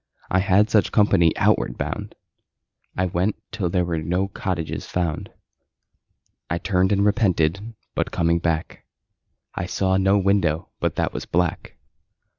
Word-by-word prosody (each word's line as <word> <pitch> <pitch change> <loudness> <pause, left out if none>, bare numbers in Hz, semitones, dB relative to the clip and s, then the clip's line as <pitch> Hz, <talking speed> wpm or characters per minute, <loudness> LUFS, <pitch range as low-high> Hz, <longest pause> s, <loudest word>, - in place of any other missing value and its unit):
I 95 - +3
had 100 +2 +3
such 105 - +3
company 100 -6 +4
outward - - +2
bound. - - -4 0.8
I 95 - +1
went 90 +3 0 0.2
till 100 -6 -2
there 90 0 +1
were 85 -2 -2
no 90 +5 -1
cottages 90 -5 -4
found. 85 -4 -2 1.2
I 85 - 0
turned 95 +1 +1
and 100 0 +2
repented, 100 0 +1 0.2
but - - -1
coming 85 0 +1
back 80 -1 -2 0.7
I 85 - -3
saw 95 0 +1
no 95 +1 +3
window 95 -4 +1
but - - -1
that - - -1
was - - -5
black. 90 -1 -1
90 Hz, 140 wpm, -23 LUFS, 85-100 Hz, 1.2 s, company